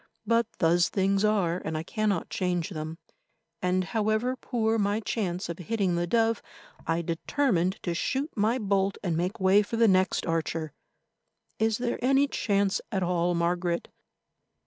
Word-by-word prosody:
But 230 -1 +2
thus 170 +1 +3
things 195 0 +1
are, 190 -5 +1
and 160 0 -3
I 155 - -3
cannot 205 -1 -1
change 180 -2 -1
them, 155 -1 -5 0.6
and, 185 0 +1
however 220 +5 0
poor 225 -3 0
my 205 +1 +1
chance 195 -5 -2
of 170 +1 -6
hitting 195 0 0
the 175 0 -1
dove, 225 +2 +2 0.5
I 165 +1 0
determined 185 - 0
to 175 - -1
shoot 270 - -1
my 220 +4 +2
bolt 200 -3 0
and 175 -4 0
make 180 +5 -2
way 190 +2 +5
for 220 +2 -4
the 230 0 +5
next 185 -1 +2
archer. 165 -1 -2 0.9
Is 220 0 +2
there 240 0 -3
any 270 +2 +4
chance 200 -6 0
at 190 -3 0
all, 175 0 +1
Margaret? 170 0 -1
195 Hz, 155 wpm, -27 LUFS, 175-220 Hz, 0.9 s, way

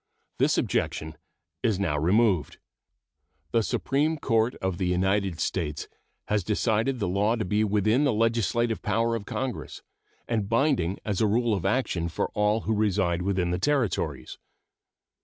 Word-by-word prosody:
This - - +3
objection 80 0 -1 0.5
is 110 -5 +1
now 85 -7 0
removed. 90 +3 +2 0.9
The 115 - +3
Supreme 145 - 0
Court 115 -2 +1
of 95 -2 -3
the 95 - 0
United 95 0 0
States 80 -3 -2 0.4
has 105 -2 +1
decided 110 +5 0
the 105 - -1
law 100 +5 +1
to 110 - -2
be 105 +4 +1
within 110 +5 +2
the 140 - +3
legislative 115 +1 +1
power 115 +3 0
of 110 -3 -4
Congress 130 -2 -4 0.4
and 110 -4 -1
binding 115 - +1
as 105 -2 -1
a 110 - +4
rule 115 +2 +2
of 95 -1 -1
action 95 -7 0
for - - -2
all 105 +1 +1
who 110 - -1
reside 100 -5 +1
within 90 -2 0
the 90 - -1
Territories. 95 - -1
105 Hz, 150 wpm, -26 LUFS, 90-115 Hz, 0.9 s, a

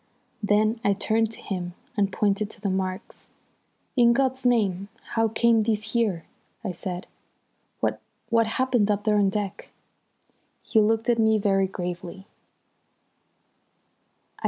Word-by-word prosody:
Then 215 +2 +2
I 200 - +3
turned 220 +2 +1
to - - -12
him 180 -3 -4 0.2
and 200 -2 +1
pointed 205 +1 0
to - - -12
the 200 -1 -1
marks. 185 0 -4 0.7
"In 235 -2 +5
God's 260 0 +1
name, 200 -6 +1 0.3
how 225 0 +3
came 225 +1 +3
these 215 0 -1
here?" 210 -8 0 0.4
I 200 - -2
said. 180 +1 -5 0.8
"What - - -1 0.3
what 230 -1 +3
happened 245 -2 +1
up 205 0 +1
there 210 -1 +3
on 200 -1 +3
deck?" 200 -1 -4 0.9
He 220 - +2
looked 225 +1 +1
at 235 -1 +2
me 220 -1 +4
very 195 -2 +2
gravely. 180 0 -6
210 Hz, 135 wpm, -25 LUFS, 195-225 Hz, 0.9 s, In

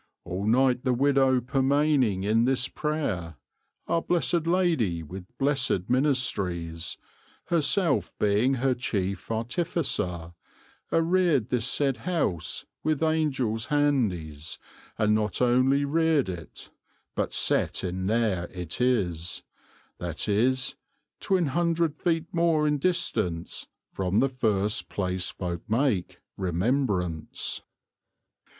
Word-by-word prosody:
All 95 +3 -4
night 125 +2 +3
the 130 -2 +2
wedowe 135 -1 +3
permayning 135 -5 +2
in 110 +3 +3
this 130 0 +1
prayer, 110 - -3 0.5
Our 165 - +1
blessed 170 -1 0
Ladie 160 - +1
with 90 +4 -9
blessed 135 -9 0
minystrys, 95 - 0 0.5
Herself 165 -1 +1
being 105 +6 +2
her 130 +1 +1
chief 100 -6 -3
artificer, 115 - -2 0.6
Arrered 165 - +2
this 125 -1 0
sayde 135 -1 +1
house 145 - -1 0.2
with 155 -1 0
Angells 135 -9 0
handys, 95 - 0 0.4
And 105 0 +3
not 105 -1 0
only 130 +3 +3
rered 160 -4 +2
it 85 -3 -8 0.4
but - - -1
sette - - +2
in 95 0 -2
there 105 -5 +1
it 90 +3 -6
is, 90 -9 0 0.6
That 85 +1 -3
is 130 +6 +2 0.4
twyne 180 -6 +1
hundred 170 +1 +1
feet 165 -2 0
more 165 -3 +2
in 150 -1 +1
distance 110 - -1 0.3
From 95 +2 0
the 135 +3 +3
first 105 -5 0
place 90 -2 -1
folk 85 -2 -4
make 115 -5 0 0.2
remembraince." 90 - -1
125 Hz, 110 wpm, -27 LUFS, 95-145 Hz, 0.6 s, night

